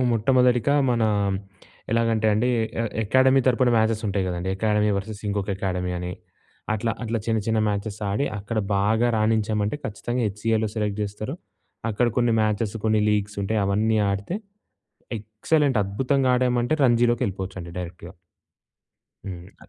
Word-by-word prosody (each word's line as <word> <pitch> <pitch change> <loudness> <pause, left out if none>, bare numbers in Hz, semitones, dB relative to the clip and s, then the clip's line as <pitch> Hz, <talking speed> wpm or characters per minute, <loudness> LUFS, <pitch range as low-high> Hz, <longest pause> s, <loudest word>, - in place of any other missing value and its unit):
మొట్టమొదటిగా 125 +3 +3 0.2
మన 120 -2 +1 0.9
ఎలాగంటే 115 -1 +2
అండి 110 +4 +2 0.3
ఎ - - +1 0.2
ఎకాడమీ 130 +5 +4
తరపున 125 0 +3
మ్యాచెస్ 110 0 +2
ఉంటాయి 100 -1 0
కదండీ. 90 0 -3
ఎకాడమీ 105 0 +2
వర్సెస్ 100 +1 -5
ఇంకొక 100 0 -2
ఎకాడమీ 90 -2 -2
అని. 90 0 -4 0.6
అట్లా 115 +2 -1
అట్లా 115 -1 -1
చిన్న 110 -1 +1
చిన్న 110 -1 +1
మ్యాచెస్ 100 0 -3
ఆడి 120 +8 0
అక్కడ 105 +3 -3 0.2
బాగా 110 +4 +2
రాణించామంటే 110 +1 +1
ఖచ్చితంగా 120 +3 -3
హెచ్‌సిఏలో 110 +2 0
సెలెక్ట్ 105 -1 -2
చేస్తారు. 105 +7 -4 0.6
అక్కడ 120 +3 +1
కొన్ని 120 -2 +3
మ్యాచెస్, 105 0 0
కొన్ని 110 -1 +3
లీగ్స్ 105 -1 0
ఉంటాయి, 105 +2 0
అవన్నీ 110 +3 +2
ఆడితే 100 - -3 0.8
ఎక్సలెంట్ 110 +5 +1
అద్భుతంగా 130 +7 0
ఆడామంటే 125 +2 +1
రంజీలోకెళ్ళిపోవచ్చండి 115 -8 +1
డైరెక్ట్‌గా. 90 0 -8 1.1
హ్మ్. 90 +1 -10
110 Hz, 130 wpm, -24 LUFS, 100-120 Hz, 1.1 s, ఎకాడమీ